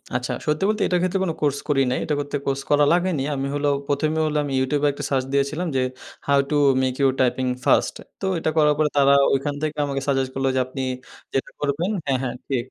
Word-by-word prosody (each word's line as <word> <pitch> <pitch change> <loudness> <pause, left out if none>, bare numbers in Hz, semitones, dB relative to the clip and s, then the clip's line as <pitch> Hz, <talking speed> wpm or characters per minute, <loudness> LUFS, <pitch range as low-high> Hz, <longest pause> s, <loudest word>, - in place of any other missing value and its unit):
আচ্ছা 125 0 -1
সত্যি 150 +4 +1
বলতে 215 0 0
এটার 180 -1 +1
ক্ষেত্রে 185 +1 0
কোন 170 - 0
কোর্স 145 -1 +1
করি 135 -2 +3
নাই, - - 0
এটা 150 - 0
করতে 145 0 -4
কোর্স 135 0 -1
করা 145 0 +4
লাগেনি। 175 -6 +1
আমি 135 0 -2
হলো 145 0 +1 0.2
১ম 145 +2 +1
এ - - +1
হল 150 - -3
আমি 140 -2 -4
ইউটিউবে 145 +2 +1
একটা 145 +1 -7
সার্চ 130 -2 0
দিয়েছিলাম 145 +6 0
যে 130 - +2 0.5
"how 140 0 +4
to - - +2 0.3
make 130 -1 0
your 135 -2 +3
typing 130 +1 +1 0.2
first" - - +3 0.3
তো - - -2
এটা 160 - 0
করার 150 -1 +5
পরে 155 -1 +2
তারা 140 0 +5 0.2
ঐখান 145 +1 -1
থেকে 155 0 -2
আমাকে 135 -1 -3
সাজেস্ট 135 -2 +1
করলো 135 0 +1
যে - - +2
আপনি 135 +1 -5 0.5
যেটা 135 - -1
করবেন 150 +6 -1 0.2
হ্যা, 135 - +2
হ্যা, 125 - -1 0.2
জী 135 - +1
140 Hz, 225 wpm, -23 LUFS, 135-150 Hz, 0.5 s, করার